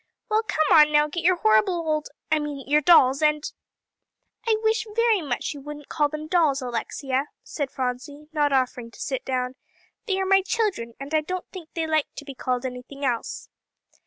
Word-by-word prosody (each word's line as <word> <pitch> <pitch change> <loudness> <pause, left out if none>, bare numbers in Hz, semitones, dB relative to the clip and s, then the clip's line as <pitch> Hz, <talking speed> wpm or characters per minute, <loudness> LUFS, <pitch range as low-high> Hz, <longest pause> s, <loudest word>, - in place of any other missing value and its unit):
Well, 430 +1 +4
come 315 -7 +1
on 300 0 +6
now, 295 0 +4
get 335 +3 -4
your 365 +2 +5
horrible 215 - +3
old 310 -3 -1 0.2
I 310 - +4
mean, 290 -3 -5
your 295 +2 +4
dolls, 275 -4 +6
and 300 -1 +2 0.5
" 465 - -31
"I 435 - +4
wish 440 0 +1
very 460 -4 +3
much 275 -3 -3
you 285 - -10
wouldn't 295 0 -9
call 295 -2 +1
them 305 +1 -6
dolls, 310 -4 +2
Alexia," 260 +2 -2 0.2
said 290 - -4
Phronsie, 260 +4 -4
not 295 -2 +2
offering 255 -3 0
to - - -17
sit 265 -2 -3
down; 255 -1 -2 0.5
"they 385 -2 0
are 385 - 0
my 385 0 +5
children, 375 - -1
and 275 +3 -7
I 310 - +4
don't 365 +4 -4
think 350 -5 -9
they 330 -1 -1
like 315 -2 +1
to 290 - -8
be 275 - -7
called 255 0 -2
anything 255 +2 -6
else." 240 -3 -2
295 Hz, 195 wpm, -25 LUFS, 265-340 Hz, 0.5 s, on